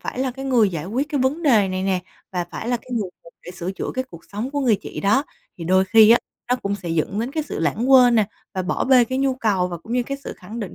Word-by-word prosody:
phải - - -6
là 260 -1 0
cái 270 +2 -8
người 245 -6 +3
giải 165 -1 -5
quyết 260 +8 -2
cái 290 -3 -1
vấn 275 +6 0
đề 220 -10 +4
này 185 0 -2
nè 190 -1 0 0.3
và 180 -1 -1
phải 230 - -5
là 245 - +2
cái 250 +2 -16
người 215 -5 -1
cần 170 - -16
phải - - -8
sửa 180 +1 -5
chữa - - -4
cái 260 0 -1
cuộc 170 - -11
sống 220 +6 -3
của 285 0 -2
người 235 -6 +3
chị - - -6
đó. 240 +9 +2 0.3
Thì 170 - -6
đôi 185 +2 +3
khi 220 +3 +6
á, 235 - +7 0.3
nó 250 - +3
cũng 200 -4 -3
sẽ 180 -3 -7
dẫn 165 +5 -1
đến 240 +3 -3
cái 310 0 -1
sự 290 - -6
lãng 245 +5 0
quên 250 -2 +7
nè 220 -3 +4 0.3
và 185 - -1
bỏ 180 - -1
bê 255 -2 +6
cái 260 +2 -3
nhu 270 -1 +1
cầu 200 -7 0
và 175 - -5
cũng 225 - -9
như 250 - +2
cái 275 +3 -4
sự - - -5
khẳng 215 +6 -8
định 195 - -6
225 Hz, 300 wpm, -22 LUFS, 190-260 Hz, 0.3 s, á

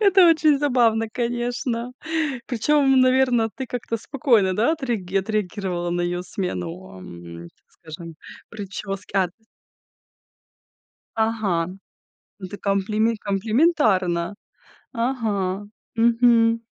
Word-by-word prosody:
это 385 -4 +6
очень 310 -3 +4
забавно, 235 -6 +2
конечно. 240 0 -2 0.5
Причем, 270 +2 +3
наверно, 255 -3 +3
ты 265 - -5
как-то 235 -1 -3
спокойно, 230 -7 +1
да, 235 +9 +3
отреаги 230 - -3
отреагировала 190 -3 -2
на 175 - -1
её 175 0 -2
смену, 180 -1 -5
ам, 85 -1 -10
так - - -32
скажем, 165 0 -10 0.4
прически. 195 -2 -7
А 185 -2 +3
т - - -25 1.8
Ага, 215 -7 0 0.7
ну, 190 -2 -7
ты 205 - -7
комплиме 210 +3 0
комплиментарно. 205 - +1 0.6
Ага, 210 -6 -1 0.3
мгм. 230 0 +4
220 Hz, 100 wpm, -23 LUFS, 185-245 Hz, 1.8 s, это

